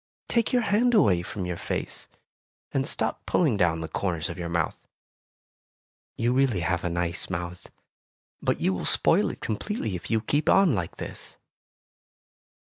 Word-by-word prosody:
"Take 230 Hz, -2 st, +1 dB
your 245 Hz, -1 st, +3 dB
hand 230 Hz, +4 st, +3 dB
away 95 Hz, -, +5 dB
from 90 Hz, +2 st, -5 dB
your 90 Hz, -1 st, -3 dB
face, -, -, -4 dB, 0.6 s
and 135 Hz, 0 st, 0 dB
stop -, -, -1 dB
pulling 150 Hz, -10 st, +3 dB
down 85 Hz, -4 st, +2 dB
the 80 Hz, -, -3 dB
corners 85 Hz, -2 st, -2 dB
of 85 Hz, -, -6 dB
your 85 Hz, -1 st, -3 dB
mouth. 85 Hz, -3 st, -2 dB, 1.3 s
You 120 Hz, +2 st, +1 dB
really 130 Hz, -8 st, +2 dB
have 90 Hz, 0 st, 0 dB
a 90 Hz, -, 0 dB
nice 85 Hz, 0 st, -2 dB
mouth, 90 Hz, 0 st, -5 dB, 0.7 s
but -, -, 0 dB
you 95 Hz, -, +2 dB
will 90 Hz, -, -3 dB
spoil -, -, +3 dB
it -, -, -8 dB
completely 110 Hz, -, -2 dB
if 85 Hz, -, -6 dB
you 110 Hz, -, +2 dB
keep 145 Hz, +7 st, 0 dB
on 195 Hz, -6 st, +5 dB
like 90 Hz, -6 st, -2 dB
this. -, -, -8 dB
95 Hz, 160 wpm, -26 LUFS, 85-135 Hz, 1.3 s, away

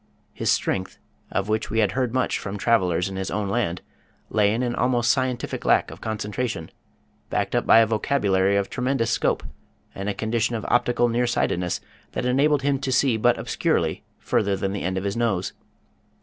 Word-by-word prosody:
His -, -, 0 dB
strength, 95 Hz, 0 st, -1 dB, 0.3 s
of 100 Hz, -, -1 dB
which 110 Hz, +1 st, -1 dB
we 115 Hz, -, -2 dB
had 105 Hz, -4 st, +3 dB
heard 130 Hz, -3 st, -1 dB
much 130 Hz, +1 st, 0 dB
from 100 Hz, 0 st, -5 dB
travelers 90 Hz, -6 st, +2 dB
in 95 Hz, -1 st, -6 dB
his 95 Hz, 0 st, -3 dB
own 105 Hz, -1 st, -2 dB
land, 95 Hz, -5 st, -1 dB, 0.5 s
lay 105 Hz, -2 st, +3 dB
in 115 Hz, +3 st, 0 dB
an 120 Hz, -1 st, -1 dB
almost 120 Hz, -1 st, +2 dB
scientific 130 Hz, -2 st, -2 dB
lack -, -, +3 dB
of -, -, -11 dB
concentration, 110 Hz, -3 st, -3 dB, 0.6 s
backed -, -, -1 dB
up -, -, 0 dB
by 115 Hz, -, +8 dB
a -, -, +5 dB
vocabulary 100 Hz, -4 st, +1 dB
of 100 Hz, -1 st, +1 dB
tremendous 125 Hz, -2 st, -1 dB
scope, -, -, +1 dB, 0.5 s
and 100 Hz, +1 st, -4 dB
a 100 Hz, -, -2 dB
condition 115 Hz, +1 st, 0 dB
of 110 Hz, -, -4 dB
optical 120 Hz, 0 st, +3 dB
near 120 Hz, +1 st, +1 dB
sightedness 90 Hz, -7 st, 0 dB, 0.3 s
that -, -, -2 dB
enabled 140 Hz, +3 st, +2 dB
him 140 Hz, -1 st, +1 dB
to 130 Hz, -, -2 dB
see 130 Hz, -1 st, +3 dB
but 110 Hz, -, +3 dB
obscurely -, -, -1 dB
further 100 Hz, -1 st, 0 dB
than 95 Hz, +1 st, -2 dB
the 100 Hz, -, -3 dB
end 95 Hz, +1 st, -2 dB
of 95 Hz, -, -2 dB
his 100 Hz, 0 st, -2 dB
nose. 110 Hz, -6 st, 0 dB
110 Hz, 190 wpm, -24 LUFS, 100-125 Hz, 0.6 s, by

